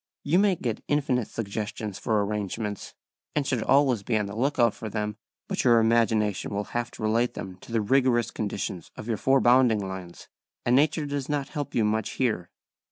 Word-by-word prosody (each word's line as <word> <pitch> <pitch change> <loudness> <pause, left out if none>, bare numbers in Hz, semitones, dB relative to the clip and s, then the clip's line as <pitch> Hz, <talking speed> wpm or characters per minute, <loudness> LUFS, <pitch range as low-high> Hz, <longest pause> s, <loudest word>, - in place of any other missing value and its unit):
You 160 +6 +3
may 200 -2 +4
get 120 -8 -4
infinite 135 -6 +1
suggestions 105 -1 -4
for 105 -2 +1
arrangements, 105 0 -4 0.4
and 150 -2 +1
should 125 -4 0
always 135 -5 +3
be 110 +2 0
on 105 - 0
the 100 +1 -7
look 135 +6 0
out 120 -3 +4
for 110 - -6
them, 105 0 -3 0.3
but - - -1
your 120 -2 +6
imagination 110 -3 +2
will 105 - -1
have 120 0 -1
to - - -8
relate 115 +3 +1
them 95 -1 -7
to 105 - -14
the 115 -1 +1
rigorous 120 0 +2
conditions 100 -4 -4
of 110 - -8
your 115 -2 0
four 135 +5 +3
bounding 120 -5 +4
lines, 95 -2 -8 0.4
and 120 - +4
nature 150 +2 +3
does 145 -1 -3
not 145 -2 -1
help 145 -2 -5
you 115 - +3
much 110 0 0
here. 110 -9 -1
115 Hz, 195 wpm, -26 LUFS, 105-130 Hz, 0.4 s, your